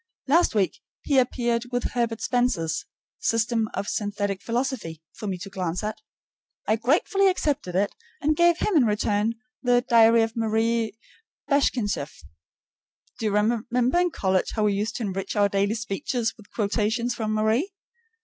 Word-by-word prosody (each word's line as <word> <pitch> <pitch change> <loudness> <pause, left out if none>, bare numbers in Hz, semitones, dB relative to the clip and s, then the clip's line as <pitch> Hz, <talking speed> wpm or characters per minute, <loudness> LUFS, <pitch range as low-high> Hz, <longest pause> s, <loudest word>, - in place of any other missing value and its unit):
Last 320 -3 +3
week 190 -5 +1 0.2
he 280 -3 +3
appeared 240 -1 0
with 245 0 -1
Herbert 230 -2 -1
Spencer's 245 - 0 0.3
"System 225 -1 +1
of 200 - -3
Synthetic 205 -2 -2
Philosophy" 235 - -2
for 210 - -7
me 190 -2 -2
to 195 +3 -8
glance 185 0 -3
at. 215 0 -4 0.7
I 220 - +3
gratefully 320 - +2
accepted 290 - 0
it, 200 +2 +1 0.3
and 305 +1 +1
gave 345 +1 +4
him 405 - 0
in 280 -6 +5
return 210 +1 +1 0.3
the 245 -1 +2
"Diary 230 -1 +6
of 225 0 -3
Marie 225 0 0 0.5
Bashkirtseff." 265 -7 0 1.0
Do 225 - 0
you - - 0
remember 240 +7 +1
in 355 - +2
college 190 - 0
how 215 - +1
we 210 -1 +3
used 210 +3 -2
to 240 - -3
enrich 195 -2 -3
our 205 -1 +4
daily 200 +2 +1
speech 225 +3 -4
with 225 -3 -2
quotations 220 +3 0
from 215 -2 -2
Marie? 220 - +1
225 Hz, 155 wpm, -25 LUFS, 205-245 Hz, 1.0 s, Diary